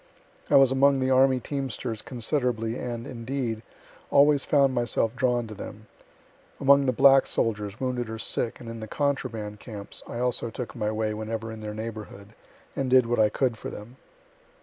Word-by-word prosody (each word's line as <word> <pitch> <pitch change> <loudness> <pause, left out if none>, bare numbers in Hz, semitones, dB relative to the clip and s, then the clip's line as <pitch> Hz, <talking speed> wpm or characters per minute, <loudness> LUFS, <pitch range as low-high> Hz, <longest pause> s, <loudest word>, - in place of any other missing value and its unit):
I - - +4
was 135 -2 +7
among 135 +1 +4
the 130 0 +1
army 130 0 +4
teamsters 130 -4 -4
considerably, 120 -2 -1
and, 120 -1 -5
indeed, 120 -3 -4 0.5
always 145 0 +4
found 140 -3 +3
myself 120 -1 0
drawn 125 -2 +1
to 110 - -8
them. 105 +1 -9 0.7
Among 140 0 +5
the - - +4
black 135 +2 +6
soldiers, 105 -2 -2
wounded 125 -3 -2
or 110 - -5
sick, 115 +1 -1
and 120 - -10
in 115 0 -6
the 110 - -6
contraband 115 -6 -2
camps, 105 -4 -8
I - - -6
also 120 -1 -1
took 120 +1 -6
my 105 -3 -1
way 110 0 -1
whenever 110 +1 -4
in 110 0 -8
their 105 0 -5
neighborhood, 110 -2 -7 0.5
and 135 -2 -1
did 130 -1 +6
what 120 0 0
I 105 -1 +5
could 120 0 -1
for - - -5
them. 115 +5 -10
120 Hz, 175 wpm, -26 LUFS, 110-130 Hz, 0.7 s, was